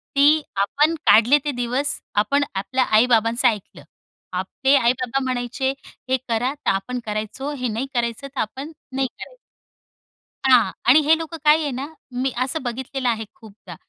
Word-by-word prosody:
ती 295 +3 +5 0.2
आपण 295 +10 +2
काढले 235 +7 +6
ते 290 - 0
दिवस, 250 +4 0 0.3
आपण 280 +7 +1
आपल्या 255 +7 0
आई-बाबांचं 235 +1 +3
ऐकलं. 210 -4 -3 0.5
आपले 230 +9 +1
आई-बाबा 250 +1 +1
म्हणायचे, 255 +1 -2 0.4
"हे 260 - +3
करा," 240 +3 0
तर 295 - -3
आपण 220 +6 -3
करायचो, 215 +7 -4
"हे 250 -2 -2
नाही 230 +5 -3
करायचं," 235 +2 -2
तर 275 0 -8
आपण 270 +8 -5 0.2
नाही 270 -1 +1
करायचं. - - -12 1.1
हां 235 -7 +5 0.2
आणि 285 +5 +8
हे 320 +1 +5
लोकं 330 0 -6
काय 305 +1 +5
आहे 290 -2 -2
ना, 265 +3 -4 0.2
मी 255 +1 -1
असं 285 +4 -3
बघितलेलं 255 +1 -3
आहे 225 -1 -2
खूपदा. 200 -5 -13
255 Hz, 155 wpm, -22 LUFS, 230-280 Hz, 1.1 s, आणि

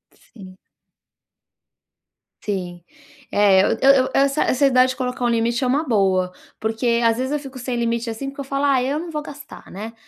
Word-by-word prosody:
Sim. 185 -4 -15 1.9
Sim. 180 -4 -4 0.5
É, 200 -2 +4
eu - - +1 0.3
eu - - -4
essa 275 +2 +2
essa 260 +2 +1
ideia 255 -1 +4
de 260 - -3
colocar 255 -1 -4
um - - +2
limite 235 +2 0
é 255 - +1
uma 280 +5 +1
boa, 190 -5 +1 0.3
porque, 235 +2 0
às 230 0 +3
vezes, 260 +2 -2
eu 295 - 0
fico 270 -2 -10
sem 250 0 -4
limite, 235 0 -1
assim, 250 +5 -5
porque 280 +1 -8
eu - - -4
falo: 275 +1 -2
"Ai, 265 -2 +2
eu 295 - -1
não 340 0 -7
vou 300 - -3
gastar", 285 -1 -12
né, 220 +4 -7
250 Hz, 190 wpm, -21 LUFS, 220-275 Hz, 1.9 s, É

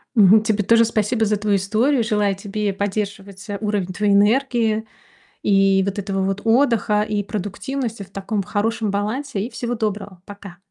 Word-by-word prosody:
Мгм. 210 0 +6
Тебе 215 -1 0
тоже 230 +3 +4
спасибо 220 +1 0
за 210 0 +1
твою 205 0 +1
историю. 225 +7 +1
Желаю 210 -2 +1
тебе 205 +1 -3
поддерживать, 200 0 -4
э, 205 - -3
уровень 205 -4 -2
твоей 205 +1 +1
энергии, 220 +1 +2 0.6
и 195 -1 +3
вот 200 +1 -3
этого 195 -1 -2
вот 195 +1 -2
отдыха 225 -3 +2
и 210 -1 -1
продуктивности 215 +4 -4
в 195 - -12
таком 200 +1 -3
хорошем 210 +2 -1
балансе. 215 +4 -2
И - - -9
всего 240 -2 -4
доброго, 205 -4 -4
пока! 200 -3 -11
210 Hz, 165 wpm, -21 LUFS, 200-225 Hz, 0.6 s, Мгм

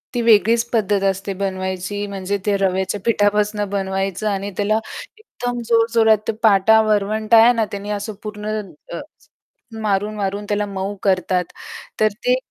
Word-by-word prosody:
ती 240 - +1
वेगळीच 230 0 +4
पद्धत 205 -3 +1
असते 195 +1 -1
बनवायची 190 +1 -3
म्हणजे 200 0 -3
ते 205 - +2
रव्याच्या 190 +1 0
पिठापासून 210 -1 +2
बनवायचं 195 0 -2
आणि 200 0 -3
त्याला 210 +1 +1 0.4
एकदम 245 - -5
जोरजोरात 225 -2 +3
पाटा 220 +1 +5
वरवंटा 215 +1 +2
आहे 240 +2 +6
ना, 225 -2 +1
त्याने 200 0 -6
असं 205 +1 -3
पूर्ण 210 0 -7 0.5
अ, - - -4 0.8
मारून-मारून 205 -1 -1
त्याला 205 0 0
मऊ 195 +1 -4
करतात. 185 -2 +1 0.5
तर 215 - +4 0.2
ते 250 0 +4
205 Hz, 135 wpm, -20 LUFS, 195-215 Hz, 0.8 s, आहे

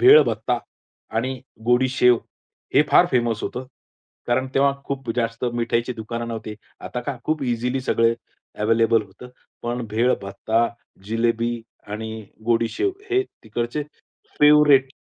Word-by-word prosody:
भेळ 405 +5 +9
भत्ता - - -1 0.6
आणि 130 +2 -1 0.2
गोडी 125 +2 +3
शेव 125 -2 +4 0.6
हे 145 - +7
फार 175 - +7
फेमस 120 -3 +1
होतं. 130 +1 -4 0.6
कारण 120 +2 +1
तेव्हा 140 0 +4
खूप 135 -4 -4
जास्त 115 0 -1
मिठाईची 120 +1 0
दुकानं 115 +1 -5
नव्हती. 110 -2 -5 0.3
आता 125 - -5
काय 130 0 -4
खूप 155 -2 0
इझिली 125 +1 -1
सगळे 115 -2 +2 0.5
अवेलेबल 115 0 +3
होतं. 105 +5 -13 0.3
पण 120 0 -3
भेळ 115 +4 +2
भत्ता, 110 +4 0 0.4
जिलेबी 115 +1 0 0.3
आणि 110 +1 -5 0.2
गोडी 115 0 +2
शेव 395 - 0 0.2
हे 385 +1 +3 0.2
तिकडचे 120 +6 -3 0.6
फेवरेट. 150 -2 +6
120 Hz, 130 wpm, -23 LUFS, 115-130 Hz, 0.6 s, भेळ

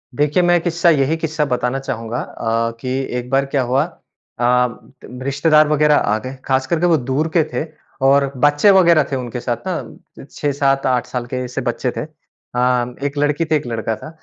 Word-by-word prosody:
देखिए 150 +5 +2
मैं 175 0 +4
एक 170 - -4
क़िस्सा 170 0 +2
यही 150 -1 +2
क़िस्सा 155 -2 -1
बताना 125 0 -1
चाहूँगा 115 -2 -4
अ, 115 +1 -2
कि 130 - -5 0.3
एक 125 0 -5
बार 135 +1 +2
क्या 135 -1 0
हुआ 130 +4 +1 0.6
अ, 125 +1 +3 0.6
रिश्तेदार 150 +2 +3
वग़ैरह 150 0 +3
आ 105 -5 +1
गए, 130 +4 -7
ख़ास 130 0 0
करके 170 0 +1
वो 165 -3 +4
दूर 135 +5 -1
के 165 - +5
थे 125 - -1 0.4
और 140 0 +4
बच्चे 145 +7 +5
वग़ैरह 170 -5 +5
थे - - 0
उनके 125 -2 -4
साथ 120 -1 -2
ना, 180 -5 -7
6-7-8 135 -3 0
साल 125 -1 -4
के 125 +1 -5
जैसे 125 +1 -4
बच्चे 120 +1 -2
थे। - - -1
अ, - - -4 1.0
एक 145 0 -2
लड़की 145 +3 +1
थी 155 0 +1
एक 135 - -2
लड़का 115 -1 -2
था। 155 - -10
135 Hz, 190 wpm, -19 LUFS, 125-150 Hz, 1.0 s, के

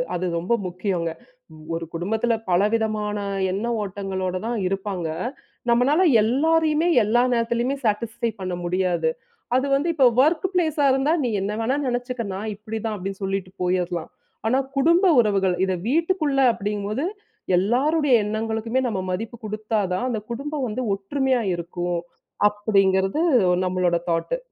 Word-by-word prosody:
அது 180 +1 -2
ரொம்ப 180 +8 0
முக்கியங்க. 180 -2 -2 0.7
ஒரு 165 0 -4
குடும்பத்தில 220 +7 0 0.2
பல 175 +2 +4
விதமான 215 -2 0 0.3
எண்ண 200 +5 -2 0.2
ஓட்டங்களோட 190 -2 -3
தான் 235 -1 -1
இருப்பாங்க. 195 -3 -3 0.6
நம்மளால 275 +10 +4 0.2
எல்லாரையுமே, 315 +6 +2 0.2
எல்லா 235 +4 +3
நேரத்திலயுமே 235 +3 0
சாட்டிஸ்ஃபை 225 +2 -1
பண்ண 185 -1 -3
முடியாது. 175 -2 +1 0.5
அது 260 +2 +2
வந்து 290 +5 0
இப்போ 275 -4 +4
வொர்க் 315 +6 +3
பிளேஸ்ஆ 315 -5 +1
இருந்தா, 270 +4 +2
"நீ 245 - 0
என்ன 200 +2 -2
வேணாலும் 265 +4 0
நினைச்சுக்க. 245 0 -3
நான் 215 +2 -4
இப்படி 220 +2 -6
தான்" 215 -1 -1
அப்படின்னு 195 +1 -6
சொல்லிட்டு 195 -1 -2
போயிடலாம். 180 -2 -1 0.4
ஆனா, 255 +3 +3 0.2
குடும்ப 335 +7 +4
உறவுகள், 195 -5 +2
இத 190 - 0 0.2
வீட்டுக்குள்ள 315 -3 +1
அப்படிங்கும் 205 0 -3
போது 270 +10 -1 0.5
எல்லாருடைய 270 - +2
எண்ணங்களுக்குமே 220 +3 -1
நம்ம 205 -5 -2
மதிப்பு 225 +5 -4
குடுத்தா 215 +1 -2
தான், 215 +7 -1
அந்த 225 -3 -1
குடும்பம் 280 +2 -3
வந்து 230 +4 -3
ஒற்றுமையா 255 +5 0
இருக்கும். 175 0 -3 0.5
அப்படிங்கிறது 195 +2 +1 0.5
நம்மளோட 180 -1 +1
தாட்டு. 165 - 0
220 Hz, 135 wpm, -23 LUFS, 190-260 Hz, 0.7 s, பல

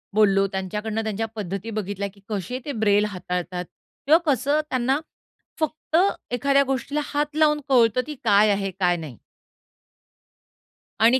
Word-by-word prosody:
बोललो. 195 -2 +4
त्यांच्याकडनं 210 +3 -3
त्यांच्या 220 0 -2
पद्धती 195 +2 -4
बघितल्या, 200 -1 -3
की 200 - -21
कसे 210 +4 -3
ते 290 - -3
ब्रेल 210 -3 +3
हाताळतात 180 -2 -4 0.4
किंवा 310 +3 +7
कसं 285 +1 +2
त्यांना 260 +2 +1 0.6
फक्त 315 0 -2 0.4
एखाद्या 275 +3 +3
गोष्टीला 270 +2 -2
हात 295 +1 -2
लावून 300 -1 +3
कळतं, 240 -2 +4
की 300 - -6
काय 205 +1 +5
आहे 195 -1 -1
काय 175 -2 +3
नाही? 150 -8 -8 1.8
आणि 235 +4 +5
220 Hz, 135 wpm, -24 LUFS, 195-270 Hz, 1.8 s, किंवा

